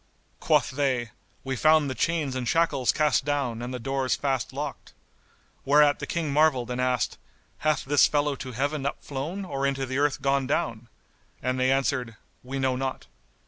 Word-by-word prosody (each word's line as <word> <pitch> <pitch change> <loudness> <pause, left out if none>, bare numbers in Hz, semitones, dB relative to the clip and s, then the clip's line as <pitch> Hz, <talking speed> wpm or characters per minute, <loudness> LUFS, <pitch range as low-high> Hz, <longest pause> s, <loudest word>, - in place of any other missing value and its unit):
Quoth - - +2
they, 130 -4 -1 0.3
"We 135 0 -2
found 155 +3 +4
the 130 - -2
chains 150 +1 -1
and 125 -2 -3
shackles 150 -6 +2
cast 150 -2 +2
down 135 -5 -1
and 120 +1 -5
the 125 - -3
doors 130 -2 -1
fast 135 -2 -1
locked." 145 +1 -6 0.7
Whereat 145 +1 +4
the - - -5
King 160 -4 -2
marvelled 140 -5 +3
and 125 +1 -2
asked, 125 -3 0 0.4
"Hath 155 -3 0
this 145 +1 +5
fellow 145 -1 0
to 130 0 -7
Heaven 140 +4 -1
up - - -5
flown 155 +8 -4
or 140 -6 -4
into 135 -1 -1
the 130 +1 -2
earth 145 -1 +1
gone 135 -1 +1
down?;" 120 -4 -1 0.5
and 130 +1 -1
they 130 +1 +3
answered, 130 -4 0 0.3
"We 130 +2 -5
know 130 -1 +1
not." 130 0 -3
135 Hz, 180 wpm, -26 LUFS, 130-145 Hz, 0.7 s, this